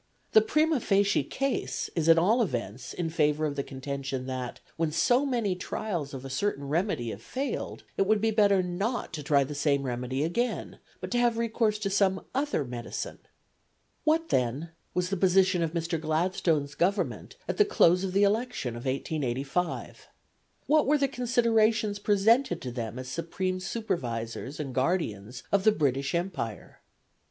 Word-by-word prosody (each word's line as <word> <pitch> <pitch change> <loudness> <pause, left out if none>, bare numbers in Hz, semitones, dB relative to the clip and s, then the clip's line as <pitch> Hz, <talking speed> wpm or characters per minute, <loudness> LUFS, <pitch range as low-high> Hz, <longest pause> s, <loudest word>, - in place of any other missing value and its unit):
The 220 - +7
primâ 310 +7 +2
facie 200 0 +3
case 275 0 -1
is 165 -1 +1
at 165 - +8
all 210 +9 +4
events 120 - -3
in 165 -2 -3
favour 150 -1 +2
of 145 -2 -2
the 140 - -1
contention 135 -1 -5
that, 130 -2 -4 0.2
when 165 -1 0
so 250 - +3
many 235 -7 0
trials 180 -4 -3
of 135 0 -7
a - - -6
certain 140 -2 -1
remedy 150 - 0
have 100 - -8
failed, 270 - -4
it 195 - +2
would 215 0 +4
be 225 +1 +1
better 200 -3 +4
not 195 +5 -2
to 155 - -4
try 140 -1 +3
the 140 +2 -5
same 140 -1 +1
remedy 125 +2 -2
again, 235 +10 -2 0.2
but - - -6
to 245 - +2
have 240 -1 +2
recourse 225 -2 +1
to 200 -2 -2
some 190 -1 +2
other 275 - 0
medicine. 120 -1 -5 0.8
What, 325 +1 +2
then, 130 +7 0 0.2
was 180 +1 0
the 195 - 0
position 185 0 +4
of 165 -1 -1
Mr. 165 -1 -2
Gladstone's 160 -2 0
Government 185 +6 -1
at - - -2
the 420 - +7
close 185 - +4
of 190 -1 -2
the 200 +1 +4
election 215 - 0
of 120 - -8
1885? 135 +4 -2 0.6
What 305 -1 +3
were 300 +2 +4
the 280 -1 +2
considerations 230 -4 +2
presented 205 0 +3
to 125 - -4
them 115 -1 -5
as 130 0 -6
supreme 175 +6 -2
supervisors 140 - -3
and 140 -4 -4
guardians 125 - -1
of 200 -1 +3
the 215 - +6
British 140 -4 0
Empire? 170 - -4
175 Hz, 165 wpm, -28 LUFS, 140-215 Hz, 0.8 s, at